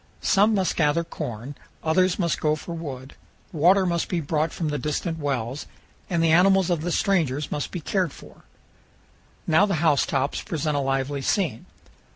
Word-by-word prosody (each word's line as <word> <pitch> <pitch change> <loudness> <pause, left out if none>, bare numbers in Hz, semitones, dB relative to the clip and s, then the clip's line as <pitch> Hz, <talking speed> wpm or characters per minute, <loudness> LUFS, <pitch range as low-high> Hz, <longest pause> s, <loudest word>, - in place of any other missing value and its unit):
Some 210 +2 +4
must 190 -4 0
gather 155 +1 +2
corn, 120 -4 -6 0.3
others 185 +3 +2
must 170 -4 -1
go 155 0 +2
for 170 +2 -7
wood, 140 -5 -7 0.4
water 185 +4 +4
must 170 -2 -1
be 175 - 0
brought 155 +1 -1
from 160 -3 -3
the 150 - -2
distant 160 +2 -2
wells, 135 -2 -3 0.4
and 170 -3 +1
the 165 - +3
animals 185 +2 +4
of 170 -3 0
the 175 +2 -2
strangers 155 -9 0
must 145 - -2
be 175 - -6
cared 185 +2 0
for. - - -15 1.0
Now 160 +5 +4
the 195 - 0
house 155 -3 +2
tops 135 +1 -1
present 155 -2 -2
a - - +1
lively 135 +1 -1
scene. 165 - -1
160 Hz, 175 wpm, -24 LUFS, 145-175 Hz, 1.0 s, Some